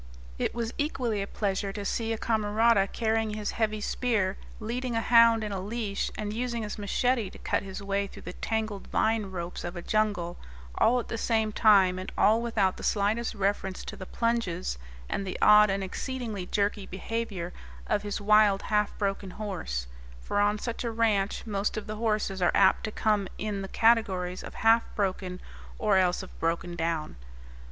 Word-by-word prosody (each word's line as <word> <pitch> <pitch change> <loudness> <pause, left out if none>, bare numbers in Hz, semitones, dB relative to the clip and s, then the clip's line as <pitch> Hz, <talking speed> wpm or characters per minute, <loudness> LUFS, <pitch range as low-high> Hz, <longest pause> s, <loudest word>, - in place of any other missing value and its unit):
It - - -1
was 235 -1 -2
equally 250 -8 -1
a 195 - -3
pleasure 200 -1 -2
to 205 -1 -5
see 225 +2 -1
a 225 - -1
camarada 220 -1 +2
carrying 220 -1 0
his 210 -1 -2
heavy 215 -2 0
spear, 205 -6 0 0.2
leading 240 +2 -3
a - - +2
hound 230 -1 +6
in 210 - -3
a 195 -2 -3
leash, 205 0 -2
and 210 -1 -3
using 235 0 -2
his 210 0 -5
machete 230 +1 +1
to - - -12
cut - - -1
his 195 +1 -7
way 200 0 0
through - - -12
the - - -6
tangled 220 -3 -3
vine 220 -2 +1
ropes 180 -2 -5
of 175 +1 -5
a 175 - -5
jungle, 205 -5 0 0.4
all 245 - +3
at 235 - -5
the 225 - -4
same 220 -2 +1
time 195 -4 +5
and 185 - -6
all 220 +3 +4
without 210 -5 +1
the - - -9
slightest 220 +3 0
reference 195 -1 -1
to - - -6
the 185 - -9
plunges, 210 - -1 0.3
and - - -2
the 190 - -4
odd 210 0 +7
and 195 0 0
exceedingly 215 -1 -4
jerky 200 -1 0
behavior, 195 -3 -4 0.3
of 210 -1 0
his 205 0 -3
wild, 210 -1 +4
half 210 -1 0
broken 195 -1 -2
horse 180 - -4 0.3
for 135 - -2
on 205 +1 +3
such 235 +3 -4
a 235 - -1
ranch 220 -3 +1
most 205 -1 -1
of 215 - -4
the 215 0 -5
horses 210 -4 -1
are 175 - +4
apt 190 - +4
to 215 - -4
come 210 -2 +1
in 205 -1 -3
the 195 - -5
categories 190 -6 +2
of - - -9
half 225 +1 +5
broken 185 -2 -2 0.4
or 210 -3 +3
else 185 0 +2
of 190 - -13
broken 170 +1 -1
down. 165 - -2
210 Hz, 185 wpm, -28 LUFS, 195-225 Hz, 0.4 s, odd